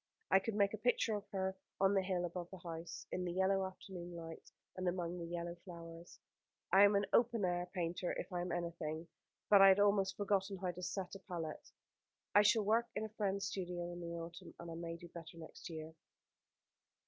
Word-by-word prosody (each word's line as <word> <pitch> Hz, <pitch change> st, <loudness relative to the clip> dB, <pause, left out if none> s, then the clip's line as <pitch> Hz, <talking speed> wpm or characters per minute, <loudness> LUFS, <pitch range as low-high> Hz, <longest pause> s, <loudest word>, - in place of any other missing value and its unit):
I 190 Hz, -, +8 dB
could 215 Hz, +2 st, -3 dB
make 200 Hz, -1 st, +3 dB
a 215 Hz, -, -4 dB
picture 230 Hz, -1 st, +2 dB
of 205 Hz, 0 st, -3 dB
her 190 Hz, -1 st, -1 dB, 0.2 s
on 195 Hz, +1 st, +5 dB
the 195 Hz, -, +4 dB
hill 185 Hz, -2 st, 0 dB
above 175 Hz, 0 st, -5 dB
the 190 Hz, -, -8 dB
house, 165 Hz, -1 st, -6 dB
in 180 Hz, -, -1 dB
the 175 Hz, -1 st, -2 dB
yellow 190 Hz, +1 st, +3 dB
afternoon 180 Hz, -2 st, -8 dB
light, 165 Hz, -1 st, -8 dB, 0.2 s
and 185 Hz, 0 st, -2 dB
among 175 Hz, 0 st, -1 dB
the 170 Hz, -, -4 dB
yellow 170 Hz, 0 st, -3 dB
flowers. 170 Hz, -1 st, -10 dB, 0.5 s
I 195 Hz, +1 st, +9 dB
am 205 Hz, 0 st, +5 dB
an 200 Hz, 0 st, +3 dB
open 235 Hz, -4 st, +4 dB
air 175 Hz, 0 st, 0 dB
painter 175 Hz, 0 st, -1 dB
if 195 Hz, -, -5 dB
I 175 Hz, -, 0 dB
am 175 Hz, 0 st, -3 dB
anything; 170 Hz, -2 st, -3 dB, 0.4 s
but 200 Hz, -1 st, +8 dB
I 195 Hz, -, +11 dB
had 195 Hz, +1 st, +7 dB
almost 200 Hz, -1 st, +3 dB
forgotten 200 Hz, -1 st, +1 dB
how 180 Hz, -1 st, -1 dB
to 180 Hz, +1 st, -9 dB
set 185 Hz, 0 st, -3 dB
a 195 Hz, -, -6 dB
palette. 170 Hz, -5 st, -5 dB, 0.6 s
I 205 Hz, -, +8 dB
shall 210 Hz, +1 st, +5 dB
work 225 Hz, +3 st, +3 dB
in 215 Hz, -, -1 dB
a -, -, -6 dB
friend's 200 Hz, -2 st, -1 dB
studio 175 Hz, -3 st, -3 dB
in 175 Hz, -, -7 dB
the 170 Hz, 0 st, -4 dB
autumn, 170 Hz, +1 st, -7 dB
and 170 Hz, 0 st, -7 dB
I -, -, -4 dB
may 165 Hz, 0 st, -5 dB
do 175 Hz, -, -10 dB
better 165 Hz, -1 st, -9 dB
next 165 Hz, +2 st, -9 dB
year." 160 Hz, -1 st, -6 dB
180 Hz, 210 wpm, -37 LUFS, 170-195 Hz, 0.6 s, I